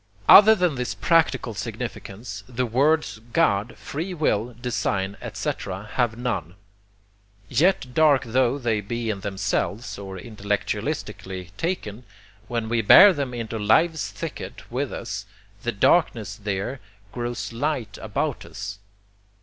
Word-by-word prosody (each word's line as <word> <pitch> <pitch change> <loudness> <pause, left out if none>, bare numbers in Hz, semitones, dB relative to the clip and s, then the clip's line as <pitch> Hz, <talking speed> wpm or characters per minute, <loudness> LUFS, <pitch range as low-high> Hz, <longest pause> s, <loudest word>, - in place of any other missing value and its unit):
Other 220 +2 +10
than 180 -5 +1
this 125 -2 -3
practical 155 -8 +2
significance, 105 -1 -6
the 125 0 -1
words 140 +2 +1
God, 115 -8 +2
free 175 +6 -5
will, 120 -7 0
design, 100 -5 -1
etc., 95 +2 -4
have 120 -3 +1
none. 120 -9 -3 0.9
Yet 135 -1 +2
dark 150 -3 +4
tho 130 +2 +1
they 115 -5 0
be 115 +2 -3
in 100 - -5
themselves, 100 +3 -2
or 95 -1 -7
intellectualistically 100 -3 -4
taken, 125 - -3 0.4
when 115 -2 -2
we 115 0 +1
bear 190 - +9
them 140 -5 -3
into 115 -1 -4
life's 160 +10 +2
thicket 165 -6 -7
with 130 +2 -2
us 100 0 -5 0.3
the 120 - -1
darkness 110 - +2
THERE 105 +5 -3 0.3
grows 120 -1 -4
light 125 -5 -2
about 120 +6 -2
us. 105 -2 -7
120 Hz, 125 wpm, -24 LUFS, 105-140 Hz, 0.9 s, Other